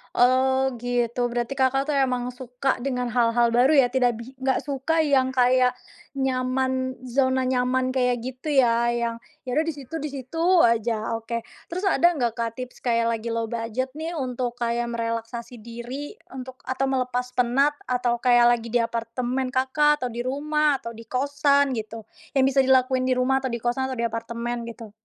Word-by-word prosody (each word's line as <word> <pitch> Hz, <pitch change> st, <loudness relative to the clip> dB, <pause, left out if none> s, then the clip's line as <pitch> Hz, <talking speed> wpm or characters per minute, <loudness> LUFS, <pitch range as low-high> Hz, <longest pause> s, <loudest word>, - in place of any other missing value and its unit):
Oh, 260 Hz, +1 st, +3 dB
gitu. 245 Hz, 0 st, -1 dB
Berarti 240 Hz, +3 st, -2 dB
Kakak 270 Hz, +1 st, +1 dB
tuh 295 Hz, -, 0 dB
emang 250 Hz, -2 st, +1 dB
suka 255 Hz, +1 st, -2 dB
dengan 250 Hz, -2 st, -1 dB
hal-hal 235 Hz, 0 st, +3 dB
baru 245 Hz, +5 st, +4 dB
ya, 250 Hz, -, +5 dB
tidak 245 Hz, -2 st, +1 dB
bi 255 Hz, +3 st, -10 dB
nggak 265 Hz, 0 st, +2 dB
suka 285 Hz, +3 st, -1 dB
yang 270 Hz, -4 st, +3 dB
kayak 250 Hz, 0 st, +4 dB, 0.5 s
nyaman, 260 Hz, 0 st, -1 dB
zona 260 Hz, 0 st, +1 dB
nyaman, 255 Hz, 0 st, 0 dB
kayak 250 Hz, -2 st, +2 dB
gitu 260 Hz, +5 st, -5 dB
ya, 235 Hz, -3 st, +3 dB
yang 235 Hz, -1 st, -1 dB, 0.3 s
ya -, -, -3 dB
udah 310 Hz, -, +3 dB
di 325 Hz, -, -2 dB
situ, 280 Hz, +1 st, -9 dB
di 300 Hz, -, -4 dB
situ 265 Hz, +2 st, -8 dB, 0.2 s
aja, 230 Hz, -2 st, +2 dB
oke. 225 Hz, +1 st, -3 dB, 0.3 s
Terus 370 Hz, +3 st, -1 dB
ada 345 Hz, -2 st, +4 dB
nggak, 240 Hz, -8 st, -1 dB
Kak, 230 Hz, -1 st, -1 dB
tips 250 Hz, 0 st, -8 dB
kayak 230 Hz, -2 st, +2 dB
lagi 230 Hz, 0 st, -2 dB
low 230 Hz, 0 st, -1 dB
budget 235 Hz, +4 st, -3 dB
nih, 320 Hz, +2 st, -4 dB
untuk 250 Hz, -2 st, -2 dB
kayak 235 Hz, 0 st, -1 dB
merelaksasi 230 Hz, +1 st, -4 dB
diri 240 Hz, +5 st, -7 dB, 0.2 s
untuk 255 Hz, 0 st, -8 dB
atau 265 Hz, +1 st, -1 dB
melepas 250 Hz, -1 st, -1 dB
penat, 250 Hz, +4 st, +2 dB, 0.2 s
atau 245 Hz, -1 st, 0 dB
kayak 240 Hz, -1 st, +5 dB
lagi 230 Hz, -, -8 dB
di 230 Hz, 0 st, +1 dB
apartemen 240 Hz, +3 st, -2 dB
Kakak, 270 Hz, +3 st, +2 dB
atau 245 Hz, -, -2 dB
di 235 Hz, -, -6 dB
rumah, 295 Hz, +3 st, +1 dB
atau 230 Hz, -3 st, -6 dB
di 230 Hz, -1 st, -12 dB
kosan 280 Hz, +1 st, +2 dB
gitu, 225 Hz, -1 st, -5 dB, 0.3 s
yang 265 Hz, -, +4 dB
bisa 270 Hz, 0 st, +3 dB
dilakuin 260 Hz, -1 st, +3 dB
di 255 Hz, -, +2 dB
rumah 265 Hz, +1 st, +2 dB
atau 260 Hz, -, -3 dB
di 235 Hz, -2 st, -4 dB
kosan 260 Hz, +2 st, 0 dB
atau 260 Hz, -, -4 dB
di 235 Hz, -, -2 dB
apartemen, 235 Hz, +1 st, -3 dB
gitu? 230 Hz, -2 st, -9 dB
250 Hz, 180 wpm, -24 LUFS, 235-265 Hz, 0.5 s, ya